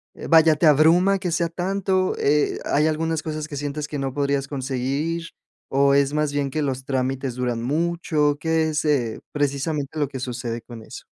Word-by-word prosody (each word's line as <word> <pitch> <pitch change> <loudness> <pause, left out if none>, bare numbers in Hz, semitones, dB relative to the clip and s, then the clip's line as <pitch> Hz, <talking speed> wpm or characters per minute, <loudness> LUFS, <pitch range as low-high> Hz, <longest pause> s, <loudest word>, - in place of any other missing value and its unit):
Eh, - - -8
vaya, 160 -1 +6
¿te 160 - +1
abruma 170 +6 +5
que 180 -2 -3
sea 170 +1 0
tanto? 185 +2 0
Eh, 150 +1 +1
¿hay 150 +2 +2
algunas 160 0 -1
cosas, 155 -1 -4
que 150 - -7
sientes 145 +1 -4
que 150 -1 -5
no 135 -1 -2
podrías 140 0 0
conseguir? 140 +5 -2 0.4
¿O 140 +1 +3
es 140 0 +3
más 150 -1 0
bien 145 -1 0
que 155 +3 -2
los 130 -2 -2
trámites 130 -1 -2
duran 125 -2 -2
mucho? 155 0 0
¿Qué 160 0 +1
es, 150 0 -1
eh, 125 -7 0
precisamente 145 +1 -2
lo 145 - +1
que 135 -1 -7
sucede 120 -2 -4
con 115 -1 -10
eso? - - -10
145 Hz, 190 wpm, -23 LUFS, 135-160 Hz, 0.4 s, vaya